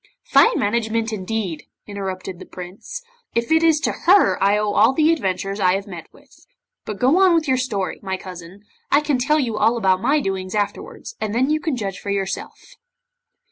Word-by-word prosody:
'Fine 470 +1 +4
management, 225 +1 0
indeed,' 190 -5 -4 0.2
interrupted 190 -3 -6
the - - -10
Prince, 185 - -9 0.3
'if 235 +4 -1
it 320 0 +5
is 325 -2 +4
to 305 - 0 0.2
her 390 +2 +5
I 200 +1 +4
owe 210 -1 0
all 220 +6 +4
the 315 +3 +3
adventures 195 - -2
I 185 -1 +3
have 195 0 -4
met 175 -5 -10
with! - - -22 0.4
But 210 - -5
go 270 +9 +4
on 375 -3 +5
with 320 -2 +1
your 260 -1 +2
story, 210 -7 -2
my 190 -1 -3
cousin. 185 +1 -11 0.3
I 285 - +4
can 295 -4 0
tell 300 +5 +2
you 235 -6 -1
all 225 +3 +3
about 190 -4 +2
my 295 +6 +2
doings 190 -5 -3
afterwards, 205 - -4
and 215 0 -2
then 260 +4 +2
you 310 - +2
can 315 -4 -2
judge 195 -4 -4
for 200 - -7
yourself. 195 -1 -3
215 Hz, 195 wpm, -21 LUFS, 195-280 Hz, 0.4 s, it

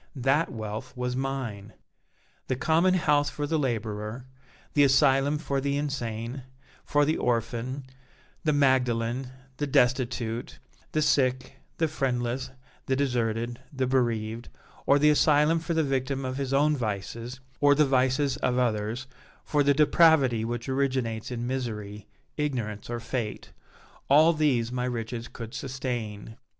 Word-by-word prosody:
That 135 +5 +1
wealth 110 +1 -6
was 125 0 -2
mine! 125 -6 -4 0.7
The 130 - 0
common 165 +8 +3
house 145 -4 +2
for 145 - -4
the 160 +2 0
laborer, 110 -2 -3 0.5
the 145 - +5
asylum 135 +1 +4
for 140 -3 -2
the 140 +1 0
insane, 120 -3 -3 0.4
for 145 0 +2
the 155 +2 +1
orphan, 125 +3 -1 0.6
the 155 - +2
Magdalen, 130 -3 +1 0.3
the 145 - -1
destitute, 120 -3 0 0.3
the 155 - +1
sick, 130 -2 +1 0.2
the 160 - +2
friendless, 130 -4 -2 0.4
the 130 - +2
deserted, 120 -3 -1
the 130 -2 -1
bereaved, 120 -3 -1 0.4
or 140 - +6
the 150 +1 +5
asylum 150 +2 +4
for 165 +1 -3
the 160 - +3
victim 135 -1 -1
of 130 0 -3
his 135 -2 -3
own 150 +2 +3
vices, 115 +1 -4 0.2
or 145 0 +5
the 150 +1 +4
vices 130 +1 +2
of 125 -1 0
others, 115 +1 -1 0.4
for 150 - +1
the 140 0 +3
depravity 150 -6 +4
which 120 +1 -4
originates 130 -5 -1
in 120 -1 -4
misery, 105 -5 -4 0.3
ignorance 120 -9 -3
or 120 0 -3
fate 115 -2 -4 0.6
all 155 +4 +6
these 135 -7 +1
my 125 0 -2
riches 120 -1 -4
could 115 -1 -9
sustain. 120 -5 -5
130 Hz, 140 wpm, -27 LUFS, 115-140 Hz, 0.7 s, or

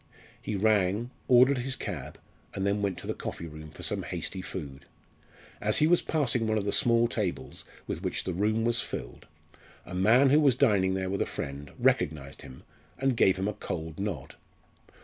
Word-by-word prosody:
He 105 - -3
rang, 105 +2 +1 0.2
ordered 125 +2 +5
his 130 +2 -1
cab, - - -6 0.4
and 95 - -2
then 100 +1 +1
went 100 -3 -1
to - - -9
the - - -2
coffee - - -6
room 75 -1 -9
for 75 - -9
some - - +1
hasty 95 - -3
food. 70 -7 -7 0.8
As - - +2
he 150 - +5
was 175 +2 +4
passing 125 -7 0
one 110 0 +1
of 100 - -1
the 100 - 0
small 115 +1 +4
tables 105 -6 -4 0.2
with - - -4
which - - -2
the 90 - -3
room 110 +5 +1
was 120 0 +3
filled, - - -7 0.6
a 90 - -9
man 115 +9 +4
who 150 - +6
was 140 -5 +4
dining 100 -8 +3
there 95 0 -2
with 100 - -1
a - - 0
friend 70 +1 -6
recognised 70 -3 0
him 65 - -12 0.3
and 135 -2 +1
gave 95 -4 +4
him 95 +1 -1
a 105 - -1
cold 80 -4 -6
nod. 100 -9 -4
100 Hz, 190 wpm, -28 LUFS, 90-120 Hz, 0.8 s, who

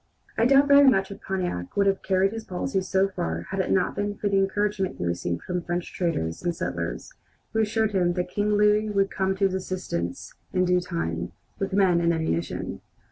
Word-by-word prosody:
I 230 - +3
doubt 275 +2 +5
very 280 -1 +8
much 195 -5 +1
if 200 - -9
Pontiac 180 - -3
would 200 - +4
have 195 -1 +2
carried 190 0 +2
his 225 0 -6
policies 190 0 -2
so 190 +1 +3
far 80 - -3
had 195 - -2
it 190 - 0
not 185 - +1
been 205 0 -2
for 205 - -2
the 195 -1 +3
encouragement 195 0 0
he - - -3
received 85 0 -2
from 180 -1 -2
French 175 0 -4
traders 80 - -2
and 175 -1 -1
settlers, - - -4 0.4
who 225 - +1
assured 220 0 +1
him 180 -3 +2
that 180 0 -2
King 205 +3 -1
Louis 210 +1 +3
would 195 -1 +1
come 190 -1 0
to 195 - +2
his 190 - +1
assistance 185 - -4 0.2
in 185 0 +2
due 180 0 +3
time, 85 - -3 0.3
with 195 - -2
men 185 -3 +4
and 170 0 +2
ammunition. 160 - -3
190 Hz, 205 wpm, -25 LUFS, 175-205 Hz, 0.4 s, very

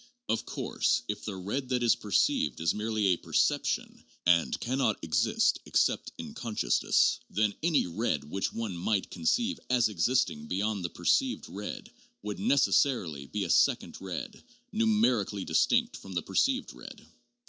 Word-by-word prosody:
Of 115 - -1
course, - - 0
if 105 0 -4
the 105 - -4
red 105 +8 -4
that 125 -2 0
is 120 - +5
perceived 75 - +1
is 80 0 +1
merely 110 0 -1
a 90 - +3
'perception' - - 0 0.2
and 85 -1 +3
can 130 +3 -2
not 110 -6 +2
exist 80 - +2
except - - +1
'in - - -7
consciousness,' 105 - +1
then 105 +1 +1
any 160 -2 +2
red 90 -3 -1
which 95 +7 -3
one 115 -5 -4
might 95 +3 -1
conceive 235 - 0
as 125 -3 +3
existing 90 -6 0
beyond 100 +2 -1
the 85 - -2
perceived 265 - 0
red 105 - -7 0.3
would 105 -2 -5
necessarily 95 - +2
be 105 +4 -3
a 90 - -4
second - - +2
red, 95 -2 -6 0.3
numerically 210 - +1
distinct 80 -1 +2
from 95 - -10
the 85 -2 -1
perceived - - 0
red. - - -12
105 Hz, 150 wpm, -29 LUFS, 90-125 Hz, 0.3 s, is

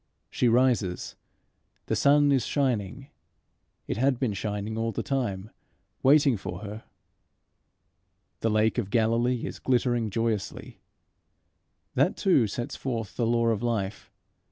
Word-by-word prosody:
She 125 - +1
rises. 115 -7 +1 0.7
The - - -1
sun 145 0 +4
is 135 -3 +3
shining. 130 -2 -1 0.8
It - - -3
had 130 +1 +2
been 120 -4 -1
shining 105 +2 -3
all 115 0 -1
the - - -3
time 110 -7 -2 0.5
waiting 140 -3 +5
for 95 -1 -6
her. 105 +1 -8 1.5
The 115 - 0
lake 110 +2 +2
of 100 -5 -3
Galilee 115 +2 +1
is - - -6
glittering 120 -3 +1
joyously. 115 -1 -3 1.1
That - - +2
too 140 - +3
sets 120 +4 -5
forth 115 -6 -4
the 115 - 0
law 115 0 +2
of 110 -2 0
life. 110 -4 -2
115 Hz, 130 wpm, -27 LUFS, 105-125 Hz, 1.5 s, waiting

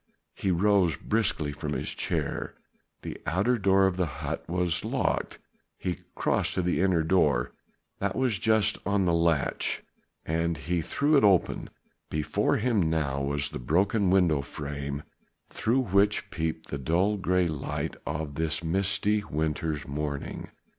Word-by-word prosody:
He 95 - -2
rose 90 -3 +3
briskly 100 -9 0
from 70 - -4
his - - -3
chair. - - -2 0.5
The - - -6
outer 100 +10 +2
door 95 0 +4
of 95 -1 +1
the 90 -2 +1
hut 70 - -4
was 90 -1 0
locked - - -1 0.4
he 90 -4 -3 0.2
crossed - - 0
to 95 - 0
the 90 0 +1
inner 90 -4 +3
door. 75 -8 +2 0.5
That 100 -1 -1
was 125 -7 +1
just 110 0 +3
on 100 0 +1
the 85 - +2
latch 85 -3 +1 0.4
and 85 0 0
he 85 +3 -1
threw 145 - +2
it - - +4
open. 95 -5 +3 0.4
Before 75 -1 +1
him 105 -8 +1
now 70 -4 0
was 70 +1 -1
the - - -6
broken 95 - +2
window 90 -6 +3
frame 70 0 -5 0.5
through 120 +4 +1
which 100 -1 +2
peeped 80 0 -3
the 70 - -3
dull 90 +9 +2
grey 90 -2 +2
light 75 -3 -3
of 75 -1 -4
this 80 +2 -1
misty 100 +4 +1
winter's 75 -2 -2
morning. 70 0 -4
85 Hz, 145 wpm, -28 LUFS, 75-100 Hz, 0.5 s, door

